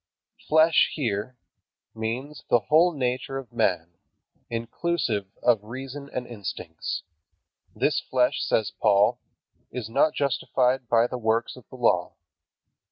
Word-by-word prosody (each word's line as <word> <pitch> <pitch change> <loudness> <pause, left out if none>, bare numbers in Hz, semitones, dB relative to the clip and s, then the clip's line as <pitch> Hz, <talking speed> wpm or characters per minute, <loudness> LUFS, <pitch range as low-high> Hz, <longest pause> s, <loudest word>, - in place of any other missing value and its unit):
"Flesh" 160 +1 +5
here 120 -3 -2 0.6
means 125 +6 -4
the - - +6
whole 155 - +4
nature 130 -2 -2
of 130 -3 -8
man, 85 -7 0 0.5
inclusive 115 - -1 0.2
of 115 -4 +3
reason 135 +5 -7
and 125 - -3
instincts. 90 -7 -5 0.7
"This - - +2
flesh," 125 -1 +1
says 110 - +1
Paul, 100 0 +3 0.5
"is 120 -4 -5
not 155 +6 +3
justified 130 -2 +1
by 115 0 +4
the 125 +1 -4
works 115 0 0
of 125 -5 -16
the - - -11
law." 90 -8 +2
120 Hz, 120 wpm, -26 LUFS, 110-135 Hz, 0.7 s, the